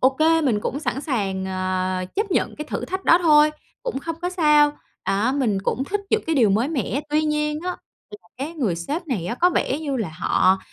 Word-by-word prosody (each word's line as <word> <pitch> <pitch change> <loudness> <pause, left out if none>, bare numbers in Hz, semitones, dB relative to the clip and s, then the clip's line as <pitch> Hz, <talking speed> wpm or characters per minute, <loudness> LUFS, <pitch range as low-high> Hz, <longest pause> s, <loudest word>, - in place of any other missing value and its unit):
OK, 265 +2 +3 0.3
mình 225 -7 +2
cũng 280 +7 -3
sẵn 275 - -2
sàng, 200 - -2
ờ, 185 0 -1
chấp 410 0 0
nhận - - 0
cái 300 - -5
thử - - -3
thách 375 +1 -4
đó 340 - +6
thôi, 300 -2 +6 0.3
cũng - - -3
không 330 +3 -5
có 355 - -1
sao, 300 -4 +4 0.3
đó, 205 +6 +1
mình 240 -8 +1
cũng 265 +6 -1
thích 410 +7 -2
những 440 - +2
cái 320 - +1
điều 230 -7 +4
mới 225 +8 +2
mẻ. 280 -2 -1
Tuy 305 +1 +2
nhiên 300 0 0
á, - - -2 0.5
là - - -26
cái 290 +5 -4
người 235 - 0
sếp 300 - -4
này 205 - -2
á, 185 - -2
có 355 +6 +3
vẻ 285 -4 0
như 285 -4 -2
là 210 -8 -2
họ 185 +2 +3
280 Hz, 225 wpm, -23 LUFS, 205-315 Hz, 0.5 s, đó